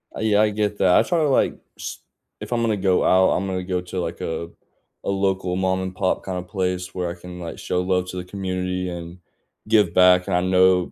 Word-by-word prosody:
Uh, - - -5
yeah, 105 -1 +3
I 110 - +4
get 105 0 -1
that. 90 -2 +4
I - - +5
try 175 -2 0
to, 155 -2 +2
like, 135 - +2 0.2
s - - -6 0.4
if - - -7
I'm 120 - +1
gonna 110 -2 +1
go 95 -1 +2
out, 95 0 +4
I'm 95 - 0
gonna 95 -1 -2
go 90 -1 -2
to, 90 +1 -5
like, 85 0 -5
a 85 +1 -4 0.6
a - - -1
local 95 -2 0
mom 95 0 0
and 95 0 -5
pop 95 - 0
kind 95 -1 -4
of 90 0 -6
place 90 -1 -2
where 90 -2 -2
I - - -4
can, 90 0 -10
like, 85 -1 -6
show 90 - -1
love 90 0 0
to 90 - -6
the 90 - -4
community, 90 -1 -3
and 85 0 -7 0.5
give 105 -6 +3
back, 90 0 +5
and 95 - 0
I 90 - +2
know 95 0 +3
90 Hz, 240 wpm, -22 LUFS, 90-95 Hz, 0.6 s, I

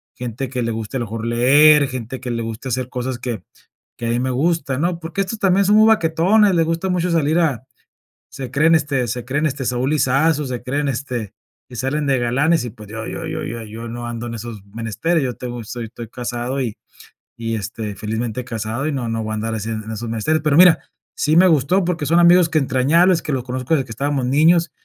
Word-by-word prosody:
gente 125 +1 -5
que 125 0 -3
le 115 - -1
guste 110 +3 -4
a - - -2
lo - - -2
mejor 115 +1 -5
leer, 145 +5 +5
gente 130 0 -6
que 125 -2 -4
le 115 0 -2
guste 115 +3 -6
hacer 125 0 -2
cosas 125 0 -4
que 120 -3 -4 0.6
que 120 - -4
a - - 0
mí 120 - +1
me 130 +1 -1
gustan, 140 0 0
¿no? 175 0 0
Porque 170 +4 -4
estos 215 +3 -5
también 195 0 +3
son 205 - +4
muy 215 +1 +6
baquetones, 195 +1 +3
le 165 - +3
gusta 165 +3 -1
mucho 180 0 0
salir 160 -1 +2
a 140 -8 0 0.7
se 130 -2 -7
creen, 160 +3 +4
este 140 -5 0
se 120 +1 -3
creen, 145 +4 -1
este, 135 -2 -3
Saúl 125 +3 0
Lisazo, 150 +2 +2
se 125 -2 -4
creen, 140 +3 -1
este 120 -5 -4 0.4
y 125 - -9
salen 135 +5 -1
de 135 -2 +2
galanes 135 +6 +1
y, 120 - -5
pues, 105 0 -13
yo 110 0 -6
yo - - -5
yo - - -4
yo 115 0 -5
yo 115 +2 -8
no 120 +1 -6
ando 120 0 -5
en 115 - -5
esos 115 -3 -8
menesteres, 115 - -1
yo 125 -2 -2
tengo 120 -1 -6
soy 120 +1 -6
estoy 115 +1 -9
casado 125 +2 -4
y 120 -5 -3 0.6
y, 115 -1 -3
este, 105 0 -5
felizmente 110 +3 -3
casado 115 +2 -3
y 155 - -1
no 130 -4 -3
no 115 0 -2
voy 110 - -4
a - - -2
andar 110 +1 -3
así 110 0 -4
en 110 -1 -5
esos 110 +1 -5
menesteres. 115 +8 0
Pero 150 -2 +3
mira, 175 -4 +7 0.4
sí 150 - +1
me 185 +2 +7
gustó 160 +4 +3
porque 175 -3 -1
son 170 +4 +4
amigos 175 0 +6
que 160 - +2
entrañables, 160 +6 +3
que 150 - -3
los 130 -2 -1
conozco 130 +3 -1
desde 135 -4 0
que - - -17
estábamos 135 +2 -1
niños 160 +5 +4
130 Hz, 230 wpm, -20 LUFS, 115-155 Hz, 0.7 s, mira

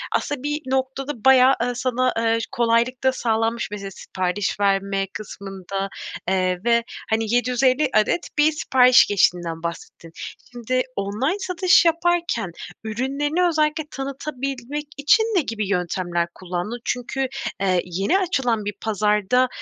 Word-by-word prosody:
aslında 290 -2 -2
bir 295 +1 -2
noktada 265 -1 -2
bayağı, 265 0 +7
eee, 245 +1 +1
sana, 255 +1 0
eee, 230 0 +2
kolaylık 235 +2 +1
da 260 - +4
sağlanmış 225 -1 0
mesela 200 -1 -6
sipariş 185 +2 -3
verme 195 -1 +1
kısmında, 195 -1 -6 0.4
eee, 185 -1 +1
ve, 235 -1 +3 0.3
hani, 220 0 0
750 255 +3 +2
adet 215 +10 +2
bir 300 +1 +5
sipariş 255 -4 +5
geçtiğinden 175 -4 +1
bahsettin. 170 0 -7 0.4
Şimdi, 250 +1 -1
online 215 - -1
satış 365 -1 +3
yaparken 335 - +1 0.3
ürünlerini 280 +10 0
özellikle 310 -1 +1
tanıtabilmek 275 0 -4
için 295 +10 +4
ne 440 -5 +1
gibi 215 -7 -3
yöntemler 175 -2 -1
kullandın? 185 +6 -4
Çünkü, 260 +2 -2 0.3
eee, 185 -2 +2
yeni 195 - +1
açılan 250 - 0
bir 205 - -2
pazarda, 210 +3 +2
240 Hz, 125 wpm, -22 LUFS, 200-275 Hz, 0.4 s, bayağı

